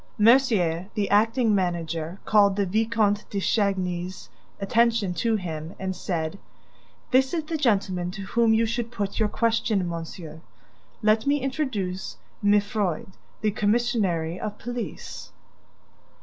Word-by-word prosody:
Mercier, 210 Hz, -8 st, +4 dB
the 205 Hz, -2 st, 0 dB
acting 225 Hz, +2 st, +3 dB
manager, 170 Hz, -2 st, -2 dB
called 200 Hz, -2 st, +4 dB
the 200 Hz, -1 st, +1 dB
Vicomte 215 Hz, +1 st, +1 dB
de 200 Hz, -, -2 dB
Chagny's 185 Hz, -3 st, -1 dB, 0.3 s
attention 225 Hz, -1 st, +2 dB
to 225 Hz, +4 st, +1 dB
him 165 Hz, -4 st, -5 dB
and 190 Hz, -1 st, -3 dB
said: 170 Hz, +1 st, -3 dB, 0.7 s
"This 265 Hz, +5 st, +3 dB
is 325 Hz, -, -1 dB
the 320 Hz, +2 st, -4 dB
gentleman 195 Hz, -, +1 dB
to 195 Hz, +2 st, -7 dB
whom 230 Hz, +3 st, +2 dB
you 225 Hz, +1 st, +4 dB
should 235 Hz, +1 st, -2 dB
put 205 Hz, -4 st, -3 dB
your 215 Hz, -1 st, +2 dB
question, 225 Hz, -5 st, +1 dB
monsieur. 165 Hz, -1 st, -7 dB, 0.6 s
Let 220 Hz, +3 st, +3 dB
me 290 Hz, +1 st, +3 dB
introduce 250 Hz, -10 st, -3 dB, 0.3 s
Mifroid, 205 Hz, -3 st, +1 dB, 0.3 s
the 215 Hz, -1 st, +2 dB
commissary 205 Hz, -6 st, 0 dB
of 210 Hz, 0 st, -5 dB
police." 245 Hz, 0 st, -6 dB
205 Hz, 125 wpm, -25 LUFS, 180-230 Hz, 0.7 s, Mercier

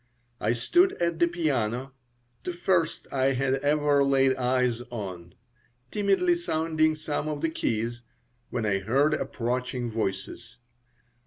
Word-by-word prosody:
I 110 Hz, +3 st, +1 dB
stood 350 Hz, -, +3 dB
at 170 Hz, -1 st, -1 dB
the 170 Hz, -, +5 dB
piano 135 Hz, -7 st, -1 dB, 0.5 s
the 180 Hz, -, -3 dB
first 175 Hz, -2 st, 0 dB
I 135 Hz, 0 st, +2 dB
had 130 Hz, +1 st, +1 dB
ever 145 Hz, 0 st, +2 dB
laid 135 Hz, -1 st, +3 dB
eyes 125 Hz, -2 st, +1 dB
on 95 Hz, -7 st, -7 dB, 0.6 s
timidly 210 Hz, -, +2 dB
sounding 160 Hz, -, +1 dB
some 155 Hz, -1 st, -3 dB
of 150 Hz, -1 st, -3 dB
the 165 Hz, -, +1 dB
keys, 115 Hz, -4 st, -2 dB, 0.5 s
when 120 Hz, -3 st, -2 dB
I 95 Hz, -2 st, +1 dB
heard 135 Hz, +10 st, +2 dB
approaching 125 Hz, -2 st, -2 dB
voices. 110 Hz, +1 st, -4 dB
135 Hz, 130 wpm, -27 LUFS, 120-155 Hz, 0.6 s, the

